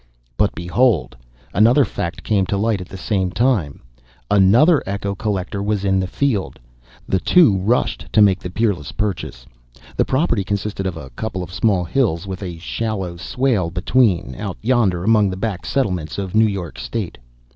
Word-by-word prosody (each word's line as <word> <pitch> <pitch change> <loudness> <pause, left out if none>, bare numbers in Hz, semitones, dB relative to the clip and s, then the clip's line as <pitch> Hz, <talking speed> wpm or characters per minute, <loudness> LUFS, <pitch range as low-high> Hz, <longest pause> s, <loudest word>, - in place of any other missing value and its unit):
But - - +1
behold, 90 - +1 0.4
another 120 +8 +5
fact 85 0 -5
came 100 -3 +1
to 100 - -1
light 105 -1 0
at 90 - -9
the 95 - -8
same 95 -1 -1
time: 100 - 0 0.5
another 115 - +5
echo 100 0 -2
collector 100 -1 -3
was 100 -1 -1
in 95 -1 +2
the 95 - -1
field. 115 -2 -1 0.5
The 95 - +1
two 135 - +5
rushed 110 +7 0
to - - +3
make 100 -3 +5
the 90 - -6
peerless 90 -6 -1
purchase. 95 -12 -4 0.5
The - - +3
property 130 - +1
consisted 100 0 -3
of 90 -3 -4
a 65 -4 -9
couple 95 - -4
of 90 - -10
small 95 -3 +1
hills 90 -2 0
with 95 0 -6
a 90 -3 -5
shallow 95 0 -3
swale 115 -3 0
between, 90 - +1
out 100 +1 -5
yonder 110 -8 +2
among 105 -1 +4
the 95 - -5
back 100 -3 -3
settlements 90 - -1
of 95 -2 -4
New 110 0 +5
York 95 -5 -5
State. - - -4
100 Hz, 170 wpm, -20 LUFS, 90-110 Hz, 0.5 s, another